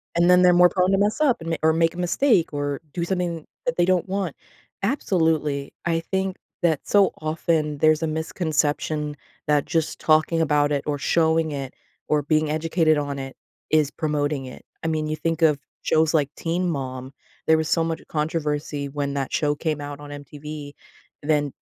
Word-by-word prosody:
And 170 Hz, +1 st, +4 dB
then 180 Hz, 0 st, +7 dB
they're 180 Hz, 0 st, +6 dB
more 180 Hz, 0 st, +7 dB
prone 185 Hz, +1 st, +2 dB
to 195 Hz, -, +3 dB
mess 205 Hz, +5 st, +1 dB
up 275 Hz, -6 st, +4 dB
and 165 Hz, -, -5 dB
ma -, -, +1 dB
or 160 Hz, 0 st, +5 dB
make 165 Hz, 0 st, +2 dB
a -, -, -11 dB
mistake 180 Hz, -, +2 dB
or 145 Hz, -1 st, -2 dB
do 175 Hz, -, -2 dB
something 175 Hz, -3 st, -2 dB, 0.2 s
that 250 Hz, -, 0 dB
they 175 Hz, -, +4 dB
don't 185 Hz, 0 st, +2 dB
want. 190 Hz, -4 st, -2 dB, 0.5 s
Absolutely. 160 Hz, -, 0 dB
I 165 Hz, -1 st, +1 dB
think 190 Hz, +2 st, -2 dB, 0.3 s
that, 160 Hz, -4 st, +3 dB
so 200 Hz, -2 st, +4 dB
often, 155 Hz, -1 st, 0 dB
there's 155 Hz, +1 st, +4 dB
a -, -, +1 dB
misconception 155 Hz, -2 st, -1 dB, 0.3 s
that 150 Hz, -1 st, +3 dB
just 160 Hz, -2 st, -1 dB
talking 155 Hz, +1 st, +3 dB
about 150 Hz, -1 st, +2 dB
it 140 Hz, -1 st, 0 dB
or 145 Hz, -1 st, 0 dB
showing 160 Hz, +2 st, +2 dB
it 135 Hz, -2 st, -5 dB, 0.3 s
or 150 Hz, -1 st, +2 dB
being 155 Hz, +1 st, +1 dB
educated 160 Hz, 0 st, +2 dB
on 145 Hz, -1 st, -3 dB
it 135 Hz, 0 st, -7 dB, 0.3 s
is 150 Hz, -1 st, +3 dB
promoting 150 Hz, -3 st, -1 dB
it. 130 Hz, -, -11 dB, 0.2 s
I -, -, -1 dB
mean, 155 Hz, -1 st, -1 dB
you 155 Hz, -, -1 dB
think 165 Hz, +1 st, -2 dB
of 150 Hz, -3 st, +4 dB, 0.2 s
shows 160 Hz, 0 st, +2 dB
like 145 Hz, -3 st, +2 dB
Teen 175 Hz, +2 st, -1 dB
Mom. 130 Hz, -3 st, -4 dB, 0.3 s
There 160 Hz, -, +6 dB
was 160 Hz, 0 st, -1 dB
so 165 Hz, -, +2 dB
much 165 Hz, 0 st, -3 dB
controversy 150 Hz, -2 st, -2 dB
when 140 Hz, 0 st, -3 dB
that 140 Hz, -2 st, -2 dB
show 150 Hz, -2 st, +2 dB
came 155 Hz, 0 st, -2 dB
out 145 Hz, 0 st, -6 dB
on 145 Hz, 0 st, -10 dB
MTV, 145 Hz, +1 st, -8 dB, 0.5 s
then 145 Hz, -2 st, +1 dB
155 Hz, 190 wpm, -24 LUFS, 145-170 Hz, 0.5 s, then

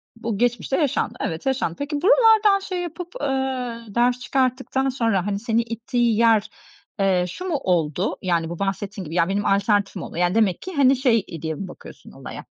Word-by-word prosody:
bu 230 Hz, -3 st, -4 dB
geçmişte 245 Hz, +3 st, 0 dB
yaşandı. 290 Hz, -5 st, 0 dB
Evet, 160 Hz, 0 st, -3 dB
yaşandı. 265 Hz, -11 st, 0 dB
Peki, 290 Hz, 0 st, -3 dB
buralardan 435 Hz, -2 st, +5 dB
şey 370 Hz, -2 st, -4 dB
yapıp, 345 Hz, +1 st, -6 dB
eee, 260 Hz, -4 st, -2 dB
ders 245 Hz, +1 st, +2 dB
çıkarttıktan 265 Hz, +1 st, 0 dB
sonra, 225 Hz, -8 st, 0 dB
hani, 200 Hz, -1 st, -1 dB
seni 230 Hz, +1 st, +1 dB
ittiği 230 Hz, 0 st, -1 dB
yer, 225 Hz, -2 st, +3 dB, 0.5 s
eee, 185 Hz, -2 st, +2 dB
şu 360 Hz, -, -7 dB
mu 345 Hz, -5 st, -1 dB
oldu? 175 Hz, +1 st, 0 dB
Yani, 170 Hz, -3 st, 0 dB
bu 170 Hz, -, -6 dB
bahsettiğin 195 Hz, -1 st, -3 dB
gibi, 160 Hz, +3 st, -7 dB
"Ya, 170 Hz, 0 st, +2 dB
benim 200 Hz, +1 st, -1 dB
alternatifim 200 Hz, -1 st, +1 dB
oldu." -, -, -8 dB
yani, 175 Hz, +2 st, +1 dB
demek 210 Hz, -5 st, +2 dB
ki, 375 Hz, -, -7 dB
hani, 275 Hz, -1 st, +5 dB
şey 245 Hz, -5 st, +2 dB, 0.2 s
diye 160 Hz, -1 st, -3 dB
mi 190 Hz, -, -6 dB
bakıyorsun 175 Hz, -, -13 dB
olaya? -, -, -9 dB
230 Hz, 180 wpm, -23 LUFS, 195-265 Hz, 0.5 s, buralardan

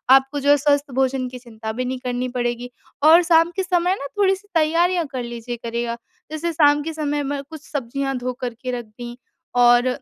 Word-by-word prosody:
आपको 270 Hz, +2 st, +1 dB
जो 285 Hz, +1 st, 0 dB
है 290 Hz, -, +7 dB
स्वस्थ 285 Hz, 0 st, +1 dB
भोजन 265 Hz, -1 st, +1 dB
की 250 Hz, 0 st, -9 dB
चिंता 220 Hz, -2 st, -7 dB
भी 250 Hz, +3 st, -3 dB
नहीं 255 Hz, 0 st, -3 dB
करनी 250 Hz, 0 st, -1 dB
पड़ेगी 240 Hz, 0 st, -2 dB, 0.3 s
और 330 Hz, +3 st, +8 dB
शाम 330 Hz, 0 st, +4 dB
के 380 Hz, -, 0 dB
समय 360 Hz, 0 st, +1 dB
ना 280 Hz, -, -5 dB
थोड़ी 390 Hz, -1 st, +4 dB
सी 410 Hz, +2 st, -17 dB
तैयारियाँ 335 Hz, +2 st, +2 dB
कर 255 Hz, -2 st, -3 dB
लीजिए 235 Hz, 0 st, -6 dB
करेगा। 235 Hz, 0 st, -3 dB, 0.3 s
जैसे 330 Hz, +2 st, -2 dB
शाम 295 Hz, -2 st, +4 dB
के 325 Hz, +2 st, -4 dB
समय 295 Hz, -2 st, -1 dB
में 280 Hz, 0 st, -3 dB
कुछ 315 Hz, -2 st, -9 dB
सब्जियाँ 270 Hz, 0 st, -2 dB
धो 250 Hz, 0 st, -3 dB
करके 250 Hz, 0 st, -4 dB
रख 235 Hz, -, -9 dB
दीं 240 Hz, +3 st, -9 dB, 0.5 s
और 240 Hz, +1 st, +5 dB
270 Hz, 205 wpm, -22 LUFS, 245-315 Hz, 0.5 s, और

